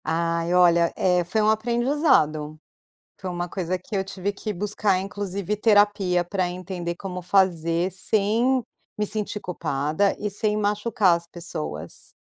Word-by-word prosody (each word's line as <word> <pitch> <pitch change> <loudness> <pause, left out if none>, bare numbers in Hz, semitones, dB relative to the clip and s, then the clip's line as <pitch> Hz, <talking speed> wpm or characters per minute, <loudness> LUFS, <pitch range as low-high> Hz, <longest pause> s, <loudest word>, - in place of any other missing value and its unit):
Ai 165 +1 0
olha, 170 -1 +5
eh, 180 -1 +2
foi 200 +6 0
um 215 - +3
aprendizado. 220 - +1 0.6
Foi 190 - -5
uma 175 0 -3
coisa 185 0 -2
que 185 +3 -6
eu 190 - 0
tive 195 +1 -3
que 210 +1 -5
buscar 205 0 0
inclusive 200 0 -3
terapia 205 -4 +3
pra 185 0 -1
entender 180 -1 -5
como 180 -1 -6
fazer 175 -2 +2
sem 220 +7 +2 0.3
me 210 - -1
sentir 210 0 -1
culpada 155 +2 -1
e 210 - -2
sem 210 +1 0
machucar 205 -3 +2
as 170 0 -8
pessoas. 155 - -7
190 Hz, 140 wpm, -24 LUFS, 175-210 Hz, 0.6 s, olha